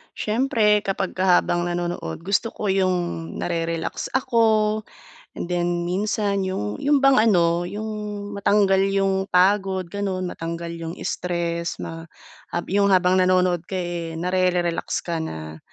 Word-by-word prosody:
Siyempre 215 Hz, -2 st, +2 dB
kapagka 190 Hz, -2 st, +2 dB
habang 175 Hz, 0 st, -1 dB
nanonood, 175 Hz, -, -3 dB
gusto 200 Hz, +6 st, 0 dB
ko 210 Hz, -, -4 dB
yung 180 Hz, -3 st, 0 dB
nare-relax 165 Hz, -1 st, -2 dB
ako, 220 Hz, -4 st, +2 dB, 0.5 s
and 175 Hz, -, -5 dB
then 175 Hz, 0 st, 0 dB
minsan 200 Hz, +2 st, 0 dB
'yung 105 Hz, -, -3 dB
'yung 285 Hz, -1 st, +2 dB
bang 275 Hz, -3 st, +6 dB
ano, 175 Hz, -3 st, +3 dB
'yung 210 Hz, 0 st, -5 dB
matanggal 200 Hz, -1 st, +3 dB
'yung 195 Hz, -1 st, +1 dB
pagod 190 Hz, +1 st, +2 dB
ganun, 195 Hz, -2 st, -2 dB
matanggal 170 Hz, -1 st, -5 dB
yung 165 Hz, 0 st, -6 dB
stress 170 Hz, -1 st, -2 dB
ma 165 Hz, 0 st, -7 dB, 0.5 s
um, 175 Hz, -, -1 dB
yung 200 Hz, +1 st, +3 dB
habang 185 Hz, -1 st, +4 dB
nanonood 185 Hz, -2 st, +2 dB
ka 190 Hz, -, -5 dB
eh, 175 Hz, -2 st, -3 dB
nare-relax 180 Hz, 0 st, 0 dB
ka 170 Hz, -1 st, -2 dB
na 80 Hz, -, -6 dB
185 Hz, 130 wpm, -23 LUFS, 170-200 Hz, 0.5 s, bang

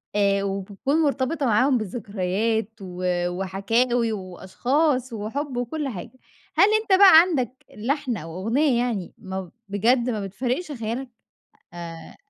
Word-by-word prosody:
آآ 200 Hz, -1 st, +2 dB
وبتكون 200 Hz, -, -1 dB
مرتبطة 285 Hz, +1 st, 0 dB
معاهم 255 Hz, +4 st, +3 dB
بذكريات 215 Hz, 0 st, -1 dB
و 180 Hz, -1 st, -7 dB, 0.3 s
وحكاوي 225 Hz, +6 st, 0 dB
وأشخاص 240 Hz, -, -1 dB
وحُب 245 Hz, +6 st, -4 dB
وكلّ 275 Hz, +5 st, -2 dB
حاجة، 235 Hz, +5 st, -8 dB, 0.4 s
هل 395 Hz, -, +6 dB
أنت 385 Hz, -3 st, +3 dB
بقى 375 Hz, -5 st, +10 dB
عندك 305 Hz, -9 st, 0 dB, 0.2 s
لحن 255 Hz, +2 st, -1 dB
أو 165 Hz, +2 st, -7 dB
أغنية 255 Hz, +3 st, +2 dB
يعني، 220 Hz, -8 st, -3 dB
ما 190 Hz, -2 st, -6 dB, 0.2 s
بجد 235 Hz, +5 st, +2 dB
ما 210 Hz, -4 st, -2 dB
بتفارقش 255 Hz, -, -3 dB
خيالك؟ 245 Hz, +1 st, -4 dB, 0.6 s
آآ، 165 Hz, -1 st, -9 dB
230 Hz, 120 wpm, -24 LUFS, 195-265 Hz, 0.6 s, بقى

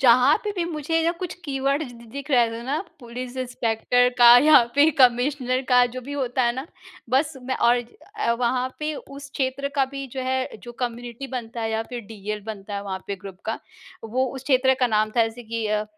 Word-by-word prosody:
जहाँ 255 Hz, +3 st, +6 dB
पे 420 Hz, -, -1 dB
भी 350 Hz, -, 0 dB
मुझे 325 Hz, 0 st, -1 dB
जब 335 Hz, +1 st, +1 dB
कुछ 360 Hz, -1 st, -4 dB
कीवर्ड्स 275 Hz, -1 st, -1 dB
द 235 Hz, 0 st, -14 dB
दिख 280 Hz, +1 st, -7 dB
रहे 240 Hz, -4 st, +4 dB
थे 230 Hz, +1 st, -6 dB
ना 275 Hz, +5 st, -1 dB, 0.2 s
पुलिस 245 Hz, +1 st, -7 dB
इंस्पेक्टर 245 Hz, -1 st, +1 dB
का 240 Hz, 0 st, +10 dB
या 305 Hz, -4 st, +8 dB
फिर 290 Hz, +3 st, +6 dB
कमिश्नर 255 Hz, +1 st, +3 dB
का 250 Hz, -1 st, +6 dB
जो 255 Hz, -, -4 dB
भी 270 Hz, +3 st, -8 dB
होता 260 Hz, -2 st, -1 dB
है 240 Hz, -1 st, +2 dB
ना, 265 Hz, +3 st, -5 dB, 0.4 s
बस 285 Hz, +4 st, +2 dB
मैं 260 Hz, +1 st, -2 dB
और 240 Hz, +1 st, +4 dB, 0.4 s
अ, 235 Hz, -, +2 dB
वहाँ 250 Hz, +2 st, 0 dB
पे 305 Hz, 0 st, -2 dB
उस 280 Hz, 0 st, -10 dB
क्षेत्र 270 Hz, +1 st, -1 dB
का 275 Hz, -2 st, +3 dB
भी 275 Hz, 0 st, -5 dB
जो 265 Hz, -, -3 dB
है 260 Hz, 0 st, -2 dB
जो 240 Hz, -, -9 dB
कम्युनिटी 240 Hz, +1 st, -4 dB
बनता 240 Hz, -3 st, -5 dB
है 225 Hz, 0 st, -1 dB
या 220 Hz, 0 st, 0 dB
फिर 245 Hz, +1 st, -7 dB
डीएल 210 Hz, 0 st, -5 dB
बनता 205 Hz, -2 st, -6 dB
है 200 Hz, -, -3 dB
वहाँ 195 Hz, -2 st, -4 dB
पे 200 Hz, -, -3 dB
ग्रुप 190 Hz, -1 st, -10 dB
का 225 Hz, -, -2 dB, 0.5 s
वो 250 Hz, +4 st, 0 dB
उस 265 Hz, -, -7 dB
क्षेत्र 265 Hz, -1 st, +3 dB
का 250 Hz, -, +5 dB
नाम 215 Hz, -1 st, +1 dB
था। 235 Hz, -, +6 dB
जैसे 225 Hz, +2 st, -6 dB
कि 225 Hz, -1 st, -3 dB
अ, 210 Hz, 0 st, 0 dB
250 Hz, 220 wpm, -24 LUFS, 230-275 Hz, 0.5 s, का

